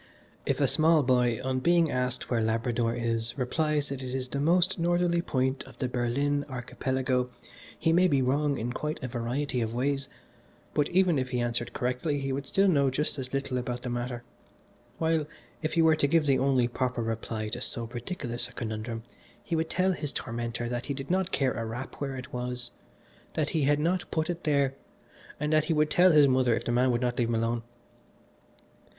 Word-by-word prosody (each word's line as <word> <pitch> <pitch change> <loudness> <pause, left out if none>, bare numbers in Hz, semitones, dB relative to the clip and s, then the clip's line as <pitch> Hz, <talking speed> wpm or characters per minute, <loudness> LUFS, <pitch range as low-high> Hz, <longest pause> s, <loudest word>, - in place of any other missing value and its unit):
If - - +1
a - - +4
small 155 -1 +4
boy, 125 -2 +2
on 130 0 0
being 170 +2 +3
asked 125 0 -2
where 115 -2 +2
Labrador 115 +1 0
is, 115 0 -2
replies 150 +3 0
that 135 -1 -4
it 130 0 -4
is 130 -1 -3
the 140 - -2
most 175 +4 +3
northerly 175 0 +2
point 130 -4 0
of - - -14
the 130 - -1
Berlin 130 +4 0
Archipelago, 130 0 -1 0.5
he 165 - +2
may 180 +2 +5
be 140 -6 +3
wrong 140 +2 +1
in 120 +2 -3
quite 150 +3 -3
a - - -1
variety 125 +2 -2
of 115 0 -2
ways, 140 +2 0 0.6
but 145 - +1
even 180 -4 +3
if 130 -1 -2
he 125 - -1
answered 120 0 -1
correctly 125 +4 -1
he 135 -1 -2
would 140 +1 -4
still 195 0 +3
know 140 -7 +4
just 145 +2 -1
as 130 -1 -5
little 135 -2 -1
about 125 0 -4
the 125 - -3
matter, 120 0 -3 0.7
while 160 -2 +1 0.3
if 155 - -2
he 165 0 +4
were 160 -1 +6
to 145 - +2
give 160 +1 +3
the 135 -2 +3
only 130 -2 +3
proper 125 -1 -1
reply 110 -1 -3
to 120 +3 -4
so 120 -2 -4
ridiculous 120 +1 -4
a 125 - -16
conundrum, 115 0 -4 0.4
he 170 - -2
would 160 0 0
tell 185 +1 +2
his 150 -5 -3
tormentor 120 0 -3
that 120 +1 -3
he 140 - -2
did 135 +4 -5
not 190 0 +1
care 135 -2 +1
a 115 - -3
rap 115 +4 -5
where 135 -2 -3
it 130 - -9
was, 125 0 -4 0.6
that 150 -2 0
he 155 -4 +1
had 145 +1 +4
not 175 +4 0
put 160 +1 0
it 175 0 -7
there, 140 -3 +2 0.7
and 150 +1 0
that 155 0 +4
he 165 - +1
would 150 0 +2
tell 180 +1 +6
his 150 -3 +7
mother 130 -3 +3
if - - -4
the - - 0
man 125 +1 +3
did 120 0 0
not 125 0 0
leave 120 - +2
him 115 - 0
alone. 115 +1 0
130 Hz, 205 wpm, -28 LUFS, 120-150 Hz, 0.7 s, his